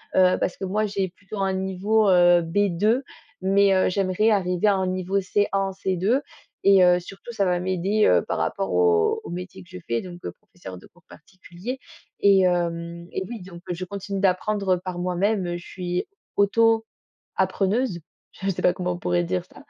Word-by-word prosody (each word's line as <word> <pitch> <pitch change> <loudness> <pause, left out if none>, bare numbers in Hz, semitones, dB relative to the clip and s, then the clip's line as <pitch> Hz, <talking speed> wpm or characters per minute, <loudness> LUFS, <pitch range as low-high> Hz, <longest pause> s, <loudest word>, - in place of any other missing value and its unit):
heu, 185 -1 +5
parce 180 - -2
que 195 - -4
moi, 210 +3 0
j'ai 195 -2 -2
plutôt 200 +3 -10
un 195 -1 0
niveau, 190 +3 +1
heu, 175 -1 +5
B2, 205 +6 +1 0.4
mais, 195 +1 +4
heu, 185 - +3
j'aimerais 195 +3 +1
arriver 180 -1 +1
à 205 - +4
un 190 -1 -1
niveau 185 +1 -1
C1, 205 +2 0 0.2
C2 195 +7 0 0.4
et 195 -1 +6
heu, 180 0 +5
surtout 195 +6 -10
ça 200 -4 0
va 180 -1 +1
m'aider, 185 +4 +1
heu, 90 - +4
par - - -3
rapport - - -2
au 85 -2 +3
au - - -9
métier 180 +2 -7
que 175 - -22
je 185 - -9
fais, 115 0 0
donc 175 -1 -10
heu, - - -3
professeur 95 - -12
de - - -14
cours 175 - -26
particuliers 185 +8 -9 0.4
et 200 -1 +6
hem 170 -1 -1
et - - -3
oui. 235 -4 -6
Donc 180 -2 -11
je 175 +1 -4
continue 200 +1 -5
d'apprendre 195 0 +1
par 180 0 -6
moi-même. 180 0 0
Je 175 - -12
suis 180 - -4 0.3
auto 225 +2 +3 0.5
appreneuse, 195 +2 0 0.3
je 195 - -5
sais 185 - -4
pas - - +4
comment 180 -1 -2
on 175 - -5
pourrait 90 - 0
dire 90 +1 -2
ça, - - -23
185 Hz, 190 wpm, -24 LUFS, 175-200 Hz, 0.5 s, et